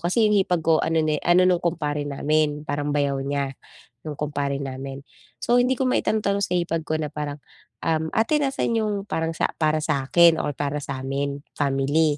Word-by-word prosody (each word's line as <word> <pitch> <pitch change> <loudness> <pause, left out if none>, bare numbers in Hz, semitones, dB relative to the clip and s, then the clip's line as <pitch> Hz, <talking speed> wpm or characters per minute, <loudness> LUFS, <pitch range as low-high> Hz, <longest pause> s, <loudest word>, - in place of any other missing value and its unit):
Kasi 210 +6 +2
yung 210 - +3
hipag 180 -3 +1
ko 160 -1 +4
ano 160 0 +2
ne 155 -1 +1
ano 175 +1 +5
nung 180 -1 +2
kumpare 150 -4 -1
namin, 150 +1 +1
parang 145 0 -2
bayaw 140 -1 +1
niya 140 -1 -2 0.5
nung 150 - -4
kumpare 145 -2 -2
namin. 135 +1 -6 0.4
So 240 +1 +3
hindi 250 +2 +2
ko - - 0
maitanong-tanong 200 -4 +1
sa - - -4
hipag 165 -2 -1
ko 155 - 0
na 150 -2 -2
parang, 150 -1 -4 0.5
um 160 -1 0
ate, 225 +8 +2
nasaan 270 -4 0
yung 210 -1 0 0.2
parang 160 0 -1
sa - - 0
para 155 0 +3
sa'kin 160 +3 +4
or 145 - -2
para 145 0 -2
sa'min 140 +1 -3 0.2
family 145 +2 +2
155 Hz, 180 wpm, -24 LUFS, 140-170 Hz, 0.5 s, ano